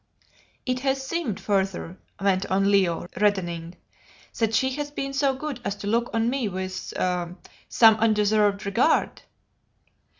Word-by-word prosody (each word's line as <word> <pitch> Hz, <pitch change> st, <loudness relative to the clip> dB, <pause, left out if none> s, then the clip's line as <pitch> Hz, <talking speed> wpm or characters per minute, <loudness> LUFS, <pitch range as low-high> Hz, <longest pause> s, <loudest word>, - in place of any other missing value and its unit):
"It 255 Hz, 0 st, -1 dB
has 270 Hz, 0 st, -1 dB
seemed, 295 Hz, -, -2 dB
further," 190 Hz, -3 st, -1 dB, 0.2 s
went 195 Hz, -1 st, +1 dB
on 195 Hz, +1 st, +2 dB
Leo, 185 Hz, -5 st, +2 dB
reddening, 175 Hz, -4 st, 0 dB, 0.6 s
"that 225 Hz, -1 st, +1 dB
she 260 Hz, +2 st, +2 dB
has 290 Hz, +2 st, -4 dB
been 275 Hz, -1 st, -4 dB
so 275 Hz, -1 st, +1 dB
good 280 Hz, -2 st, -5 dB
as 200 Hz, 0 st, -2 dB
to 205 Hz, -, -9 dB
look 230 Hz, +3 st, +1 dB
on 225 Hz, 0 st, 0 dB
me 250 Hz, -3 st, 0 dB
with 185 Hz, 0 st, -4 dB
some 180 Hz, -1 st, -3 dB, 0.6 s
undeserved 210 Hz, -2 st, +2 dB
regard." 230 Hz, +10 st, +1 dB
210 Hz, 135 wpm, -25 LUFS, 190-260 Hz, 0.6 s, on